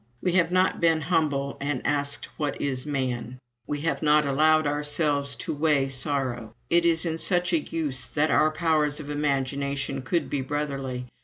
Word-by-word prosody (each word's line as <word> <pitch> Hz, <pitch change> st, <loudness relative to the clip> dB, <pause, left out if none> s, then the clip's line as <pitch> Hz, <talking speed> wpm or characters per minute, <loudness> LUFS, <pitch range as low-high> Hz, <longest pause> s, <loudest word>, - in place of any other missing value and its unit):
We 180 Hz, -, 0 dB
have 170 Hz, -2 st, +3 dB
not 185 Hz, +1 st, +2 dB
been 165 Hz, -1 st, +4 dB
humble 145 Hz, -4 st, 0 dB
and 140 Hz, -2 st, -2 dB
asked 145 Hz, -1 st, -1 dB
what 145 Hz, -3 st, -2 dB
is 135 Hz, -1 st, -2 dB
man; 130 Hz, -3 st, -2 dB, 0.3 s
we 145 Hz, 0 st, -3 dB
have 165 Hz, +1 st, -1 dB
not 150 Hz, -1 st, +4 dB
allowed 155 Hz, +3 st, +3 dB
ourselves 145 Hz, -1 st, 0 dB
to 115 Hz, -, -4 dB
weigh 145 Hz, -2 st, +2 dB
sorrow. 130 Hz, -4 st, -3 dB, 0.2 s
It 170 Hz, 0 st, +4 dB
is 165 Hz, 0 st, +1 dB
in 165 Hz, -1 st, -2 dB
such 180 Hz, 0 st, 0 dB
a 165 Hz, -, +4 dB
use 150 Hz, -4 st, -3 dB
that 155 Hz, +1 st, +1 dB
our 155 Hz, -, +4 dB
powers 155 Hz, -2 st, +1 dB
of 150 Hz, -1 st, -6 dB
imagination 140 Hz, -1 st, -1 dB
could 165 Hz, +4 st, -1 dB
be 140 Hz, -, -2 dB
brotherly. 135 Hz, -3 st, -3 dB
145 Hz, 170 wpm, -26 LUFS, 140-155 Hz, 0.3 s, been